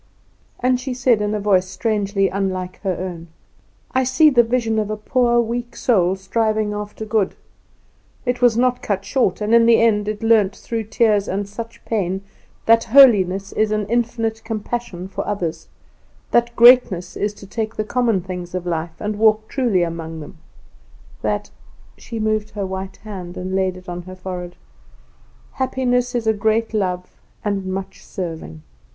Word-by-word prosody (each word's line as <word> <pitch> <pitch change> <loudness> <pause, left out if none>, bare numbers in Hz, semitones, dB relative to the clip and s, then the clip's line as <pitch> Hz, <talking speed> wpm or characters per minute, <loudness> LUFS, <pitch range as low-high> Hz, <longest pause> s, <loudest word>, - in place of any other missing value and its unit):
And 250 0 +2
she 255 0 -4
said, 245 -3 +3
in 210 0 0
a - - -1
voice 195 -3 +2
strangely 200 -1 0
unlike 185 -2 -3
her 190 -3 -1
own: 175 -2 -6 0.6
"I 260 0 +2
see 260 +5 +5
the 240 -3 +6
vision 230 -2 0
of 210 -1 -2
a 215 - -2
poor, 240 +2 +2
weak 235 +1 -2
soul 190 -6 +2
striving 215 +2 0
after 210 +1 -6
good. 210 -3 0 0.9
It 245 0 -1
was 240 -2 +4
not 250 0 +2
cut 195 -1 -2
short, 210 -4 0
and 210 +2 0
in 230 0 +6
the 230 -1 +6
end 210 -3 +3
it 215 +1 -3
learnt, 215 -4 +4
through 225 -2 -4
tears 215 -2 +2
and 200 +1 -2
much 230 0 -8
pain, 195 -3 -1 0.4
that 230 0 +5
holiness 200 -7 +5
is 215 0 +1
an 215 -1 0
infinite 230 -1 -1
compassion 220 -4 -4
for 195 +1 -5
others; 180 -6 -3 0.6
that 235 0 +2
greatness 235 -7 +5
is 205 - -1
to 200 - -12
take 220 +2 -4
the 215 - -1
common 230 -3 +1
things 180 0 -6
of 180 -1 -3
life 165 -1 -3
and 210 0 -3
walk 215 0 +3
truly 235 -10 +1
among 165 -1 -5
them; 160 +3 -11 0.8
that" - - -2 0.4
She 230 -2 -7
moved 215 -1 0
her 200 -1 -2
white 190 0 -5
hand 185 -4 -8
and 185 +1 -4
laid 190 -1 0
it 185 - -14
on 175 0 -5
her 185 +1 -10
forehead 180 -1 -6 1.0
"happiness 250 -1 0
is 235 -2 -1
a 220 - +3
great 220 +2 0
love 180 -4 -2 0.2
and 200 -2 -1
much 190 0 -5
serving. 160 - -6
210 Hz, 170 wpm, -20 LUFS, 185-230 Hz, 1.0 s, the